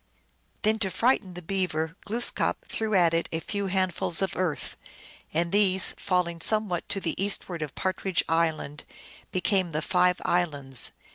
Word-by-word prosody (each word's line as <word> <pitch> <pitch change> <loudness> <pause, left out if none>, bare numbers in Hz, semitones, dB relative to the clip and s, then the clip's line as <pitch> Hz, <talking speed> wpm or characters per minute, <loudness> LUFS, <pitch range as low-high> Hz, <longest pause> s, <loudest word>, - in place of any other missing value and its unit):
Then, 220 0 +2
to 195 -3 0
frighten 210 -4 +1
the 180 - -8
Beaver, 160 -3 -1
Glooskap 235 +3 0
threw 220 -2 -1
at 170 -3 +4
it 165 0 0
a 160 - -1
few 200 +3 -2
handf 185 -2 0
uls 170 +3 +1
of 190 - -2
earth, 180 -5 -2 0.6
and 170 +2 0
these, 190 -2 +3
falling 175 -3 -1
somewhat 210 -3 +1
to 195 - +1
the 170 -4 -2
eastward 185 -4 0
of 150 -3 -5
Partridge 190 -1 -1
Island, 160 -3 0 0.5
became 185 -2 +1
the 155 - -1
Five 180 0 +2
Islands. 145 -7 +2
180 Hz, 155 wpm, -27 LUFS, 165-195 Hz, 0.6 s, at